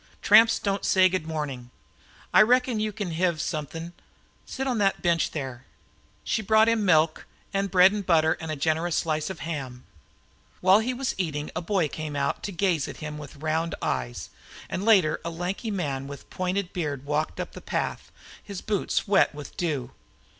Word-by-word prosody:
Tramps 225 +2 +7
don't 200 -1 -2
say 185 -1 +5
'Good 180 -3 -2
mornin''. 140 -6 -4 0.6
I - - +8
reckon 250 +1 +3
you 215 0 -1
kin 205 -4 -4
hev 170 0 0
somethin'. 165 +1 -4 0.5
Sit 265 - -4
on 250 -4 0
the 195 -1 +4
bench 170 -2 +1
there." 130 -4 -6 0.6
She 220 - 0
brought 220 +1 +4
him 230 -2 +2
milk, 160 -4 +3 0.3
and 195 0 0
bread 185 +1 +6
and 205 -1 -3
butter, 160 -3 +3
and 160 - -5
a 155 - -2
generous 160 +3 0
slice 155 -1 -1
of 190 - -7
ham. 135 -6 -5 0.7
While 190 +3 +6
he 230 +3 -1
was 255 +1 -2
eating, 150 -4 -2
a - - -1
boy 180 -2 +1
came 155 0 -6
out 140 0 -1
to 205 - -3
gaze 175 -5 0
at - - -8
him 150 -1 -6
with 150 0 -10
round 160 +1 0
eyes, - - -3 0.4
and 185 - -2
later 190 -9 +4
a - - -3
lanky 180 +7 -4
man 140 -9 -2
with 140 -1 -10
pointed 185 0 -2
beard 145 -6 -3
walked 150 +2 -1
up - - -4
the - - -10
path, - - -3 0.3
his 200 -3 -7
boots 210 -1 -1
wet 195 -6 +3
with 145 -1 -9
dew. 145 -8 -2
170 Hz, 180 wpm, -26 LUFS, 155-200 Hz, 0.7 s, I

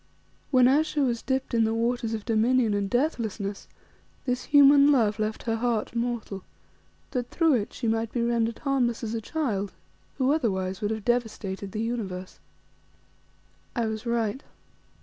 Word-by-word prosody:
When 255 -2 +5
Ayesha 300 +2 +2
was 240 -4 0
dipped 265 -1 -2
in 230 -1 +3
the 220 0 +1
waters 230 0 0
of 215 - -7
Dominion 230 0 +2
and 200 -1 -1
Deathlessness, 225 -7 -2 0.6
this 250 -1 -1
human 285 0 +7
love 220 -6 +2
left 215 0 -2
her 225 -1 -1
heart 230 -2 -1
mortal, 235 -5 -3 0.7
that 250 -2 -2
through 325 -3 +3
it 230 -1 0
she 235 - -4
might 225 0 0
be 240 - -1
rendered 235 -1 0
harmless 255 -5 0
as 225 0 -3
a 225 - -2
child, 215 -7 -2 0.4
who 265 0 +2
otherwise 190 -9 -1
would 205 - 0
have 220 -2 -4
devastated 210 -5 -2
the 215 +2 -3
universe. 195 -6 -4 1.4
I 235 - 0
was 220 +1 -4
right. 235 +1 0
230 Hz, 155 wpm, -26 LUFS, 215-250 Hz, 1.4 s, human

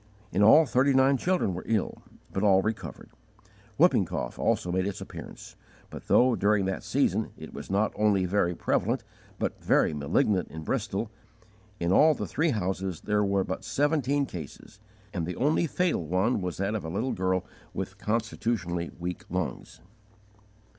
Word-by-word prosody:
In 95 - +1
all 145 +10 +8
thirty 135 0 +2
nine 135 +1 +5
children 180 - 0
were 90 - -4
ill, 110 -4 -1 0.3
but 95 - -1
all 95 -2 +4
recovered. 110 -2 -5 0.7
Whooping - - +5
cough - - -4
also 90 - +1
made 95 +1 0
its 100 - -4
appearance; - - -10 0.4
but - - -9
though, 125 -1 +5
during 100 -1 +2
that 95 0 -3
season, - - +1
it - - -10
was - - -8
not 100 +2 +1
only 105 -3 +2
very 90 -2 +1
prevalent - - 0 0.3
but - - -3
very - - +3
malignant 90 - +1
in 80 +1 -8
Bristol, 100 +7 -2 0.7
in 85 +1 0
all 155 +10 +6
the - - -4
three 160 +3 0
houses 95 - -2
there 105 0 +1
were 100 -1 +1
but 95 - -5
seventeen 145 -1 +1
cases, 90 - -9 0.3
and 85 -4 -2
the 90 - -4
only 155 +5 +2
fatal 180 - 0
one 95 +7 +1
was 90 -1 -3
that 100 +2 -1
of 110 - -3
a 80 - -5
little 110 +10 -1
girl 95 0 0 0.3
with 95 +1 -5
constitutionally 105 -6 -2
weak 90 0 -5
lungs. - - -4
100 Hz, 165 wpm, -28 LUFS, 90-120 Hz, 0.7 s, all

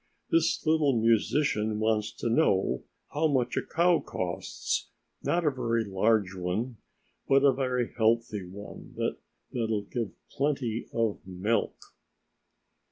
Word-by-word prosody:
"This 330 - +2
little 150 -6 +3
musician 110 -1 +2
wants 110 0 +1
to - - -4
know 100 - +2 0.3
how 160 +2 +2
much 130 -4 +1
a - - +1
cow 170 0 +3
costs, 90 -2 -3 0.3
not 175 -1 +1
a 150 - +4
very 115 -3 0
large 100 0 +2
one, 95 +7 -2 0.5
but 135 0 +5
a 140 -2 +6
very 125 -2 -1
healthy 110 -3 +1
one 100 +3 -10 0.6
that'll 110 -3 0
give 115 0 -3 0.2
plenty 135 -5 -1
of 115 -3 0
milk!" 95 +5 0
115 Hz, 120 wpm, -29 LUFS, 105-135 Hz, 0.6 s, a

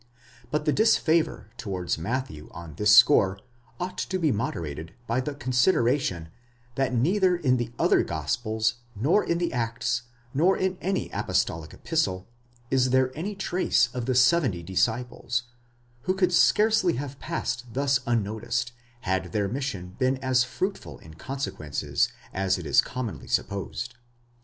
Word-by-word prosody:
6 120 - -32 0.4
But 150 +3 -1
the 150 - +3
disfavour 165 - +2
towards 95 -8 -3
Matthew 100 - -3
on 85 -2 -9
this 105 +6 +5
score 95 -9 +6 0.4
ought 180 +1 -4
to 185 - -1
be 160 -5 +2
moderated 80 - -4
by 120 +2 0
the 140 +2 -4
con 130 -2 -4
sideration, 125 - +2 0.4
that 135 +1 0
neither 180 - +2
in 130 -7 +2
the 120 -1 -3
other - - +4
gospels, 110 -1 -1 0.2
nor 145 - +2
in 170 - 0
the 170 -3 -1
Acts, 120 0 -1 0.3
nor 175 +8 +3
in 185 -1 -1
any 190 +1 -1
apostolic 80 -1 -1
epistle, 95 - -1 0.4
is 130 -1 +3
there 130 0 +2
any 195 +7 -4
trace 185 -10 +1
of 125 -1 -4
the 130 - +1
seventy 130 - +3
disciples, 120 +5 -1 0.6
who 185 - +1
could 185 -2 +2
scarcely 210 +1 +4
have 140 0 -5
passed 125 -7 -3
thus 140 0 +2
unnoticed, 115 +1 -1 0.3
had 95 -2 -1
their 105 -2 +1
mission 100 -7 -4
been 130 0 +2
as 130 -1 +2
fruitful 190 +10 -4
in 80 - -14
consequences, 80 - -2 0.2
as 95 0 +1
it 90 - -7
is 70 - +5
commonly 110 - -5
supposed. 100 +4 -2
125 Hz, 145 wpm, -26 LUFS, 100-150 Hz, 0.6 s, score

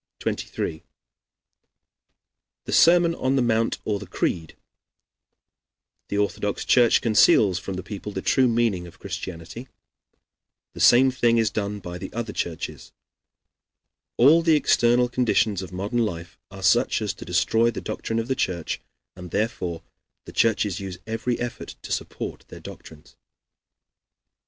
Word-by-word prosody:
23 80 - -4 1.8
The - - -5
Sermon 170 0 +5
on 130 -4 0
the 135 - +2
Mount 115 -1 +1
or 105 -2 -1
the 105 - -9
Creed 80 -2 -3 1.5
The 100 - -3
Orthodox 105 0 -1
Church 120 -2 +4
Conceals 105 -4 +4
from 95 0 -6
the 95 - -5
People 105 +1 -7
the 95 -1 -5
True 130 -2 +3
Meaning 115 -7 0
of 85 - -15
Christianity 90 +8 -7 1.1
The - - -10
Same 130 +2 +6
Thing 120 -2 +2
is 110 -2 +2
Done 105 -1 -3
by 90 -1 -7
the 95 - -7
Other 115 -2 -4
Churches 85 -2 -5 1.3
All 150 +7 +6
the 165 -1 +4
External 125 -4 +3
Conditions 115 -5 +1
of 95 - -8
Modern 100 +6 -2
Life 90 -3 -5
are 95 -1 -10
such 120 +5 +3
as 105 -2 -2
to - - -10
Destroy 110 +7 +2
the 115 - -4
Doctrine 115 +1 -4
of 115 0 -1
the 130 - +1
Church, 90 -9 -2 0.3
and 90 -1 -9
therefore 90 -5 -2 0.4
the - - -10
Churches 105 -4 +1
use 95 -2 -6
Every 115 +2 -2
Effort 120 0 -6
to - - -8
Support - - -5
their - - -11
Doctrines. 75 -1 -13
105 Hz, 140 wpm, -24 LUFS, 95-120 Hz, 1.8 s, Same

